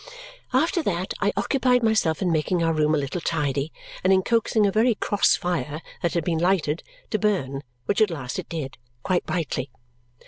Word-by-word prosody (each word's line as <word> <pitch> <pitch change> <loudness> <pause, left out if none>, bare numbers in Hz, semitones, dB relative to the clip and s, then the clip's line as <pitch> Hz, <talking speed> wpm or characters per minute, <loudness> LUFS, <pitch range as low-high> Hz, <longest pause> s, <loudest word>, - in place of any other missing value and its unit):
After 330 +8 +2
that 185 - -2
I 205 0 +3
occupied 250 -3 +2
myself 215 -7 +2
in 180 - +1
making 165 +2 +1
our 165 0 +2
room 155 0 +2
a - - +2
little 145 +5 -3
tidy 145 -2 -1 0.3
and 185 - +4
in 190 0 +4
coaxing 230 -1 +2
a 200 - +2
very 225 +3 +3
cross 205 -1 +3
fire 155 -5 -2 0.2
that 170 -2 0
had 170 - +1
been 165 -2 0
lighted 170 -3 +1 0.3
to 215 - +1
burn, 140 -11 0 0.2
which 205 +2 +1
at 215 - +5
last 140 -7 -4
it - - -7
did, 140 -5 -5 0.2
quite 180 -1 0
brightly. 145 -6 -2
175 Hz, 185 wpm, -24 LUFS, 155-210 Hz, 0.3 s, at